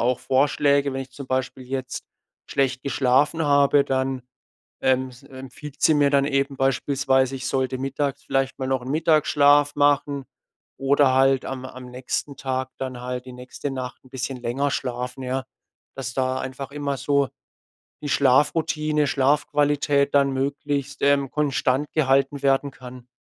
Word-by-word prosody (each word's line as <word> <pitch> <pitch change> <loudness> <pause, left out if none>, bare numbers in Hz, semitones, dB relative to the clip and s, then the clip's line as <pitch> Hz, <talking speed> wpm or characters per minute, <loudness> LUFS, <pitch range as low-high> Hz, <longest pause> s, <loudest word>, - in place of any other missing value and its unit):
auch 125 +1 +1
Vorschläge. 140 +1 +2
Wenn 135 - -2
ich 130 - -13
zum 140 +1 -9
Beispiel 130 0 -2
jetzt 130 0 -5 0.4
schlecht 135 -1 0
geschlafen 140 +4 +2
habe, 140 0 +4
dann, 130 -1 -1 0.6
ähm, 130 0 +2
s 125 +2 -16
empfiehlt 135 +1 -11
sie 160 - +5
mir 145 -1 +4
dann 140 -1 +3
eben 140 -1 0
beispielsweise, 135 0 +1
ich 125 -1 -5
sollte 130 -1 -1
mittags 135 +1 -2
vielleicht 135 0 -1
mal 130 - -2
noch 130 -1 0
'n 130 - -7
Mittagsschlaf 145 -2 +3
machen 145 -1 +2 0.5
oder 135 0 +3
halt 135 0 +3
am 130 -1 -5
am 130 -1 -10
nächsten 130 +2 -4
Tag 130 -1 -2
dann 130 -2 -5
halt 125 0 -5
die 130 - -10
nächste 125 +3 -6
Nacht 130 -1 -6
'n - - -17
bisschen 130 0 -4
länger 130 +4 -1
schlafen, 125 +1 -4
ja. 130 +1 -2 0.5
Dass 125 -3 -5
da 130 0 0
einfach 135 +1 -6
immer 140 -2 -3
so 140 -1 +1 0.7
die 145 - -3
Schlafroutine, 150 +2 +2
Schlafqualität 145 0 +2
dann 140 -1 +4
möglichst, 140 0 -2
ähm, 140 -1 +2
konstant 140 -1 0
gehalten 140 -1 +2
werden 135 +1 +2
kann. 125 -1 -12
135 Hz, 155 wpm, -23 LUFS, 130-145 Hz, 0.7 s, sie